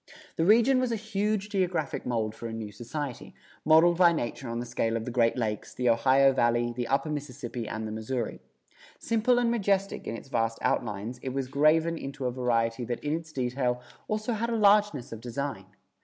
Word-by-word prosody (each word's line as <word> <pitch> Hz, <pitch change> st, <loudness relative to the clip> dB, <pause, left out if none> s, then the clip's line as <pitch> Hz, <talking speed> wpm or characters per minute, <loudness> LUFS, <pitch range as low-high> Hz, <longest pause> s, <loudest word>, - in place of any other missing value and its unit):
The 165 Hz, -, +1 dB
region 235 Hz, +6 st, +5 dB
was 255 Hz, -2 st, 0 dB
a -, -, +1 dB
huge 210 Hz, -1 st, -1 dB
geographic 185 Hz, -, -1 dB
mold 110 Hz, -3 st, -1 dB
for 115 Hz, +1 st, -7 dB
a 115 Hz, -, -6 dB
new 110 Hz, -2 st, -5 dB
society, 120 Hz, +5 st, -6 dB, 0.3 s
modeled 165 Hz, +2 st, +5 dB
by 175 Hz, -2 st, +7 dB
nature 130 Hz, -4 st, -3 dB
on 115 Hz, -, -3 dB
the 120 Hz, -, -4 dB
scale 115 Hz, -1 st, -1 dB
of 115 Hz, -, -5 dB
the 125 Hz, -, -4 dB
Great 115 Hz, 0 st, +2 dB
Lakes, 110 Hz, -3 st, -3 dB
the 125 Hz, -1 st, +1 dB
Ohio 135 Hz, +4 st, +4 dB
Valley, 120 Hz, -1 st, +1 dB
the 120 Hz, -1 st, -2 dB
upper 140 Hz, +3 st, 0 dB
Mississippi 130 Hz, -5 st, -5 dB
and 110 Hz, 0 st, -4 dB
the -, -, -5 dB
Missouri. 110 Hz, +2 st, -3 dB, 0.6 s
Simple 230 Hz, +2 st, +2 dB
and 240 Hz, -1 st, +2 dB
majestic 195 Hz, -3 st, 0 dB
in 115 Hz, -, -3 dB
its -, -, -12 dB
vast 115 Hz, -2 st, 0 dB
outlines 110 Hz, +2 st, -1 dB
it 130 Hz, +1 st, -5 dB
was 135 Hz, -2 st, -1 dB
graven 155 Hz, +4 st, +3 dB
into 135 Hz, 0 st, -6 dB
a 125 Hz, -, +1 dB
variety 120 Hz, -1 st, 0 dB
that 120 Hz, 0 st, -4 dB
in 150 Hz, 0 st, -1 dB
its 160 Hz, -1 st, -7 dB
detail 125 Hz, -2 st, -1 dB, 0.3 s
also 215 Hz, +2 st, -1 dB
had 230 Hz, +2 st, -2 dB
a 235 Hz, -, 0 dB
largeness 205 Hz, -, +3 dB
of 115 Hz, -1 st, -7 dB
design. 135 Hz, +4 st, -4 dB
135 Hz, 200 wpm, -28 LUFS, 120-180 Hz, 0.6 s, by